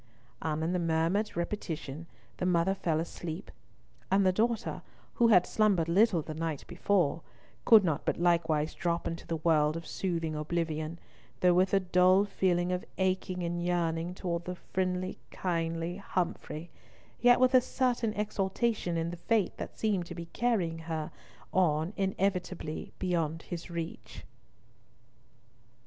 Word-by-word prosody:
And 155 0 -1
in 170 +3 0
the 180 - +1
murmured 170 +5 0
repetition 165 -4 -4 0.3
the 180 - -2
mother 180 +1 +3
fell 165 -5 0
asleep, 165 +2 -5 0.6
and 195 0 +3
the 185 - +5
daughter, 225 +2 0 0.4
who 235 - +7
had 180 -6 +6
slumbered 200 -7 +2
little 180 -1 +3
the 155 - -6
night 160 -2 -3
before, 175 -6 +1 0.4
could 220 -3 +8
not 160 -4 0
but - - 0
likewise 165 -3 +2
drop 170 0 -1
into 165 - -5
the 165 - -1
world 155 -1 +2
of 165 - -7
soothing 165 -4 -2
oblivion, 155 +1 -2 0.4
though 180 -1 +5
with 185 +2 +3
a 195 - +4
dull 185 +1 +4
feeling 180 -3 +1
of 180 0 -1
aching 185 -1 0
and 175 0 -2
yearning 170 0 0
towards 170 -2 -3
the 180 - -3
friendly 185 0 -2
kindly 165 0 -2
Humfrey, 175 -4 -3 0.5
yet 245 0 +6
with 255 +1 +4
a 255 - +7
certain 245 -3 0
exultation 205 -2 -1
in 165 +1 -1
the 175 - -7
fate 215 +3 +1
that - - -7
seemed 200 -6 0
to 175 - -7
be 170 0 -6
carrying 190 -9 0
her 160 -1 -4 0.4
on 165 -1 +2
inevitably 185 -4 -2
beyond 165 -3 -1
his 175 0 -6
reach. 170 -1 -6
175 Hz, 145 wpm, -30 LUFS, 165-190 Hz, 0.6 s, could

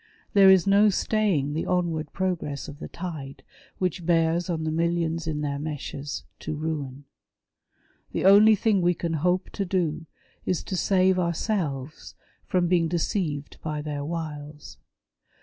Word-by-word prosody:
There 195 -1 +7
is 190 -2 +6
no 200 +2 +5
staying 190 -8 +1
the 160 - -2
onward 165 -4 -1
progress 175 -7 -2
of 145 +1 -10
the - - -6
tide 155 -6 -7 0.3
which 180 -1 -2
bears 165 +1 +2
on 160 -2 -1
the 155 - -1
millions 165 0 0
in 150 -2 -2
their 140 -1 -2
meshes, 145 -1 -5 0.2
to - - -4
ruin. 145 -3 -4 1.1
The - - -2
only 210 +3 +8
thing 205 -1 +2
we 175 0 +2
can 165 0 -3
hope 180 +4 0
to 200 - -2
do, 165 -4 -1 0.4
is 180 - -1
to 190 - -4
save 185 0 +3
ourselves 165 - -2 0.3
from 180 -1 +1
being 170 -2 +3
deceived 160 -3 -2
by 150 -1 -3
their 145 -1 -4
wiles. 150 -2 -6
165 Hz, 150 wpm, -26 LUFS, 150-185 Hz, 1.1 s, only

